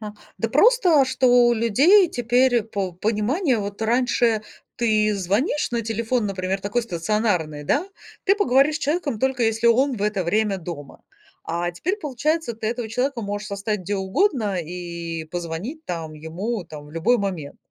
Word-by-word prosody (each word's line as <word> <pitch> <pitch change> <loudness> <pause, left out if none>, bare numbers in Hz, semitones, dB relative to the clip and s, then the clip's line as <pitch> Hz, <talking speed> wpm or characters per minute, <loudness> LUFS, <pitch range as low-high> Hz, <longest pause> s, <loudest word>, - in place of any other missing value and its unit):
Ага, 210 -1 -7 0.2
да - - -1
просто, 375 - +5
что 260 0 +1 0.2
у - - +4
людей 280 - +5
теперь 245 0 +2
по 200 -4 -4
пониманию. 225 - 0
Вот 200 +2 -5
раньше 235 -1 +2 0.3
ты 215 -3 +2
звонишь 200 - 0
на 235 -1 0
телефон, 225 +1 -1
например, 190 0 -2
такой 210 +5 -1
стационарный, 175 -6 -1
да, 310 - +1 0.4
ты 395 - +4
поговоришь 300 -5 +3
с - - -5
человеком, 295 -6 -1
только 265 0 0
если 225 +1 +1
он 250 +2 +3
в 200 - -4
это 210 -2 0
время 205 +2 +1
дома. 160 -5 -9 0.4
А 170 +1 -2
теперь 370 - -2
получается, 300 - -1
ты 220 0 -3
этого 235 -1 -3
человека 250 +3 -1
можешь 205 +1 -4
застать 200 +1 -2
где 195 +3 -3
угодно 205 - 0
и 170 -1 -6
позвонить 175 - -6
там 165 - -5
ему 180 +7 -4
там 150 -2 -10
в 150 - -15
любой 220 +10 +2
момент. 180 -8 -4
215 Hz, 165 wpm, -23 LUFS, 185-255 Hz, 0.4 s, просто